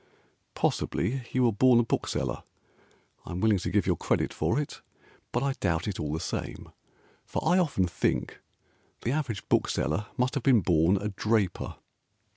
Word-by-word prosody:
Possibly 120 +6 -1
you 130 - +2
were 120 - +4
born 120 +3 +5
a - - +4
bookseller. 115 - -2 0.8
I - - -8
am 90 - -3
willing 105 -1 +3
to - - -3
give 105 - +2
your 90 - +2
credit - - 0
for 80 - 0
it, 150 - -5 0.5
But 120 - 0
I 140 -1 +1
doubt 85 -7 -1
it 100 - -3
all 75 -1 -2
the 80 - -2
same, 80 - -5 0.5
For - - -3
I 180 +3 +5
often 145 - +2
think 90 0 -1 0.6
the 120 - 0
average 130 - -2
bookseller 90 +9 +1
Must 125 0 +1
have 140 - -1
been 125 -4 +5
born 85 +2 +3
a 105 +2 -2
draper. 105 -1 0
105 Hz, 170 wpm, -28 LUFS, 90-130 Hz, 0.8 s, born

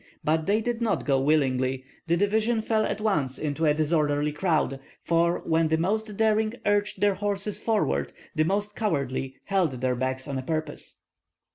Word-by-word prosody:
But 160 +2 +1
they 210 +2 +3
did 240 +1 -2
not 230 - 0
go 135 -2 +2
willingly; 130 -3 +1 0.2
the 170 +1 +2
division 220 +3 +1
fell 220 -1 +1
at 205 - -2
once 155 -12 0
into 155 +1 -1
a 150 - +5
disorderly 150 -1 +1
crowd, 150 -4 0 0.2
for 170 +1 +1
when 160 0 +2
the 160 +1 +2
most 210 +4 -1
daring 220 0 +2
urged 205 0 +1
their 205 -1 +4
horses 200 +1 -2
forward 220 -2 0 0.2
the 155 -2 +2
most 205 +4 -1
cowardly 135 - -2
held 190 -7 +1
theirs 125 -1 0
back 130 +1 -2
on 135 -2 -3
purpose. 155 +3 -4
165 Hz, 165 wpm, -26 LUFS, 145-205 Hz, 0.2 s, a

